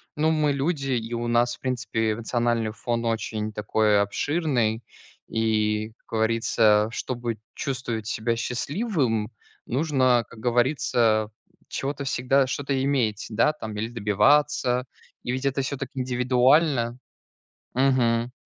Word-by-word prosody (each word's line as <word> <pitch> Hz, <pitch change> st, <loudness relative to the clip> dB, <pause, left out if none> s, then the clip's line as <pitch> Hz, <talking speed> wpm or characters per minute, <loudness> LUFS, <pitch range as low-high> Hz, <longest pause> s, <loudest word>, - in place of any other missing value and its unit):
ну, 155 Hz, +1 st, +2 dB
мы 150 Hz, -2 st, +2 dB
люди, 140 Hz, -1 st, -1 dB
и 120 Hz, -2 st, -2 dB
у 120 Hz, 0 st, -2 dB
нас, 120 Hz, +1 st, +2 dB
в -, -, -24 dB
принципе, 115 Hz, -4 st, -1 dB
эмоциональный 115 Hz, 0 st, -1 dB
фон 120 Hz, +1 st, -3 dB
очень 110 Hz, -1 st, -2 dB
такой 105 Hz, 0 st, +2 dB
обширный. 120 Hz, -, 0 dB, 0.4 s
И, 110 Hz, -1 st, 0 dB
как -, -, -43 dB
говорится, 110 Hz, -1 st, +2 dB
чтобы 120 Hz, -2 st, -3 dB, 0.2 s
чувствовать 120 Hz, -6 st, -3 dB
себя 115 Hz, +1 st, -1 dB
счастливым, 125 Hz, -, -1 dB, 0.3 s
нужно, 130 Hz, -3 st, +2 dB
как 115 Hz, -, -13 dB
говорится, 120 Hz, -3 st, +2 dB, 0.4 s
чего-то 140 Hz, +1 st, -3 dB
всегда 135 Hz, +1 st, +2 dB
что-то 135 Hz, 0 st, -1 dB
иметь, 120 Hz, -7 st, 0 dB
да, 115 Hz, +8 st, +3 dB
там, 110 Hz, -8 st, -7 dB
или 110 Hz, +2 st, -3 dB
добиваться. 125 Hz, +3 st, +2 dB, 0.4 s
И 120 Hz, -, -2 dB
ведь 130 Hz, +2 st, -3 dB
это 135 Hz, 0 st, +1 dB
всё 135 Hz, +1 st, -3 dB
так 140 Hz, -2 st, -5 dB
индивидуально. 125 Hz, 0 st, +2 dB, 0.8 s
Мгм. 125 Hz, -2 st, +2 dB
120 Hz, 125 wpm, -25 LUFS, 110-135 Hz, 0.8 s, да